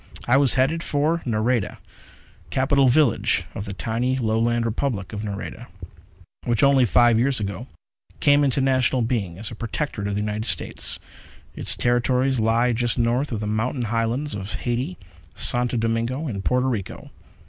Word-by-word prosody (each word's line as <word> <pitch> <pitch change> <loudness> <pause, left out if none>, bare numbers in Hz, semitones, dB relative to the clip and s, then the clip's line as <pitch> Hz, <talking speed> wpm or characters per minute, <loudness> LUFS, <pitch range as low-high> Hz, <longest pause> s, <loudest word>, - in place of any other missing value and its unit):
I 120 - +4
was 135 -1 +4
headed 135 +6 +1
for 155 +2 0
Nareda, 115 0 0 0.7
capital 135 +1 +2
village 130 -1 +3
of 100 - -5
the 100 - -6
tiny 120 +6 -1
Lowland 115 0 +1
Republic 110 -4 -2
of 105 - -4
Nareda, 100 -2 -6 0.8
which 115 -3 0
only 140 -2 +5
five 120 +3 +4
years 130 +1 +1
ago 100 -3 -5 0.5
came 145 0 +4
into 135 -1 +1
national 130 -2 +2
being 105 -8 -2
as 110 +3 -6
a - - -7
protectorate 115 -2 -3
of 100 - -2
the 105 - -1
United 105 +1 -3
States. 95 -5 -1 0.6
Its - - 0
territory 125 +2 +1
lies 115 +1 +2
just 120 0 0
north 120 +4 +1
of 110 -3 -3
the - - -3
mountain 110 +4 -1
Highlands 115 +6 -1
of 100 0 -5
Haiti, 120 -6 -3 0.4
Santo 125 0 +2
Domingo 115 +6 -1
and 100 -6 -4
Porto 125 +4 +1
Rico. 110 -8 -4
120 Hz, 160 wpm, -23 LUFS, 110-130 Hz, 0.8 s, only